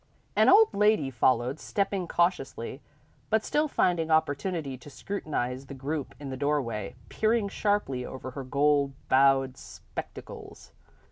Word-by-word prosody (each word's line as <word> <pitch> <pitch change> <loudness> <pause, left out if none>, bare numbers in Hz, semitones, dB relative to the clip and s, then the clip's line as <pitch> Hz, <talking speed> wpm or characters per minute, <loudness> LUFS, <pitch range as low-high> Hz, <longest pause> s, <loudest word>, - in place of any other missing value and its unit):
An - - +5
old 430 +3 +6
lady 210 -9 +3
followed, 125 +3 +1
stepping 195 -3 -1
cautiously, 150 -7 -1 0.5
but 220 0 +2
still 300 +1 +1
finding 175 - +1
opportunity 155 -1 0
to 130 +3 -13
scrutinise 135 -7 -4
the 140 - -8
group 140 +2 -4
in 140 -2 -6
the 130 - -5
doorway, 120 -9 -1
peering 220 -1 +1
sharply 205 -13 0
over 130 0 -7
her 135 +1 -6
gold 140 +1 +2 0.2
bowed 135 -1 +4
spectacles. - - -9
145 Hz, 130 wpm, -28 LUFS, 130-190 Hz, 0.5 s, old